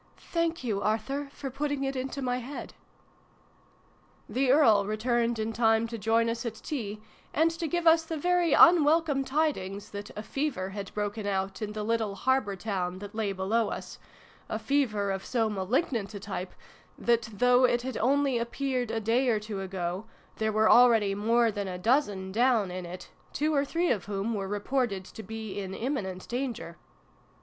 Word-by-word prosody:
" - - -34 0.2
Thank 335 -3 0
you 210 -5 -1
Arthur, 270 +7 -1
for 275 -2 -6
putting 285 +1 -2
it 270 0 -2
into 265 +2 -3
my 250 0 0
head! 265 +4 -7 0.8
" - - -34 0.7
The 260 0 0
Earl 225 -9 +5
returned 235 +2 0
in 220 +1 -2
time 225 0 +3
to 230 - -5
join 225 +2 +2
us 230 0 -2
at 230 -3 -4
tea, 215 -6 -5 0.4
and 325 +2 +4
to 330 0 -3
give 345 +3 -1
us 325 0 +7
the 325 0 -4
very 355 +1 +2
unwelcome 320 -4 +5
tidings 265 -9 -1
that 205 0 -6
a 210 - -4
fever 265 -9 -2
had 195 0 -6
broken 205 0 -2
out 195 +1 -2
in 210 -1 -3
the 215 0 -4
little 220 -2 0
harbour 235 -1 +1
town 185 -2 -3
that 205 +2 -9
lay 215 -2 -1
below 200 +4 0
us - - -7 0.5
a - - -1
fever 215 -8 0
of 195 0 -3
so 230 -3 0
malig 215 - 0
nant 220 -5 -2
a - - -5
type 190 -2 -6 0.4
that, 235 -1 +1
though 250 +4 +4
it 240 -1 +1
had 260 -2 -4
only 270 0 +2
appeared 250 0 -2
a 225 - -1
day 235 +4 +2
or 220 -3 +2
two 210 -2 -5
ago, 185 +1 -3 0.3
there 220 0 0
were 215 +1 +3
already 225 -5 +6
more 230 +3 +2
than 205 -1 -4
a 180 -1 -4
dozen 205 -3 +1
down 225 -3 +2
in 180 -1 -5
it, 180 +1 -9 0.2
two 305 +1 0
or 280 -1 +3
three 335 +5 0
of 205 -7 -1
whom 205 +3 -2
were 195 -2 -3
reported 205 -1 -1
to 220 - -10
be 220 0 -6
in 190 -1 -5
imminent 195 -8 -3
danger. 240 -9 -4
225 Hz, 185 wpm, -28 LUFS, 200-270 Hz, 0.8 s, us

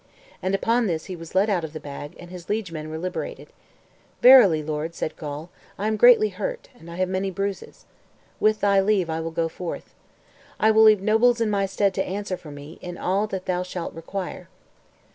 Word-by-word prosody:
And 190 +1 0
upon 230 +3 +1
this 160 -3 -2
he 185 - -6
was 165 0 -11
let 195 +3 +4
out 190 -5 0
of 160 -1 -6
the 155 - -6
bag, 145 0 -8
and 175 0 -11
his 180 -2 -10
liegemen 170 -8 -3
were 160 - -5
liberated. 180 +2 -5 0.7
"Verily, 205 -12 +8
lord," 155 +2 -4
said 155 - -4
Gawl, 150 +2 -7 0.3
"I 200 - -3
am 215 0 +1
greatly 435 - +6
hurt, - - -5
and 170 -9 -15
I 170 - -8
have 185 +1 0
many 190 +1 -1
bruises. 195 +1 -5 0.5
With 215 0 +2
thy 200 -1 +4
leave, 190 -4 +1
I 160 - -2
will 165 0 -3
go 165 0 -1
forth. 170 +1 -7 0.7
I 220 - +5
will 220 0 +5
leave 215 -3 +6
nobles 230 +3 +3
in 225 -2 +1
my 200 -1 +1
stead 195 0 +1
to - - 0
answer 195 0 -4
for 165 -3 -12
me 145 +3 -11
in 175 0 -7
all 195 +3 0
that 190 -3 -5
thou 180 -1 -1
shalt 180 -1 -5
require." 180 +1 -6
185 Hz, 205 wpm, -24 LUFS, 165-210 Hz, 0.7 s, Verily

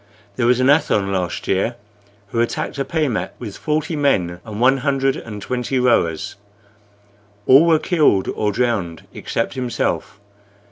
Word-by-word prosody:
There 120 - +1
was 125 0 +3
an 130 - +3
Athon 140 -9 +3
last 90 -2 -3
year 100 +5 0 0.5
who 115 - -2
attacked 120 +4 -2
a - - +1
pehmet 150 -7 -2
with 110 -5 -7
forty 155 +1 -2
men 90 - +1
and 105 -1 -7
one 130 +3 +4
hundred 135 0 0
and 105 -2 -7
twenty 125 +1 -2
rowers. 100 -8 +1 1.1
All 140 +6 +7
were 165 -1 +5
killed 150 - +2
or 105 -1 -1
drowned 100 -8 -1
except 115 - -3
himself. 120 -5 -2
120 Hz, 145 wpm, -20 LUFS, 100-140 Hz, 1.1 s, All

